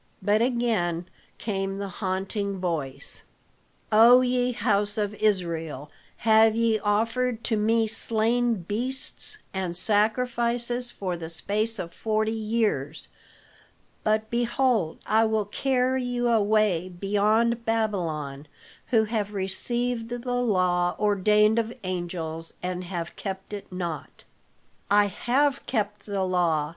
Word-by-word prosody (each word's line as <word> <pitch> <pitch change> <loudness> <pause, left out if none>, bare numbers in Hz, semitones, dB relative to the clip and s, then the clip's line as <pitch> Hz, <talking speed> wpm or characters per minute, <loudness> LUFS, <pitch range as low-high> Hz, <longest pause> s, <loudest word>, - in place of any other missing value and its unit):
But 210 +2 +3
again 220 -9 0 0.3
came 195 -2 -2
the 200 0 -3
haunting 195 +1 -3
voice, 150 -7 -3 0.7
"O 235 +4 +8
ye 250 0 +1
house 205 -3 +1
of 205 -1 -1
Israel, 165 -9 -1 0.3
have 220 0 +6
ye 230 -1 +2
offered 230 +3 0
to 225 - 0
me 225 +2 +2
slain 230 +2 +1
beasts 255 - -3 0.2
and 185 -3 -2
sacrifices 235 +4 0
for 185 -6 -4
the 165 -1 -6
space 215 +6 -1
of 170 -3 -6
forty 220 0 0
years. 215 - -1 0.9
But 215 0 +1
behold, 240 -6 +1
I 220 +1 +3
will 220 -1 +1
carry 260 +3 0
you 245 -1 0
away 210 -5 +2
beyond 210 +5 +1
Babylon 165 -11 -2 0.4
who 225 -3 +3
have 210 -2 -2
received 230 +5 -1
the 245 +1 -3
law 180 -5 +2
ordained 210 +2 +3
of 225 0 -2
angels 170 -3 -4
and 180 0 -3
have 170 -2 -5
kept 190 0 -6
it 205 -2 -7
not." 175 -4 -5 0.7
"I 205 0 +5
have 270 +7 +1
kept 210 -3 -2
the 200 -2 -1
law!" 170 -5 +1
210 Hz, 120 wpm, -26 LUFS, 185-230 Hz, 0.9 s, O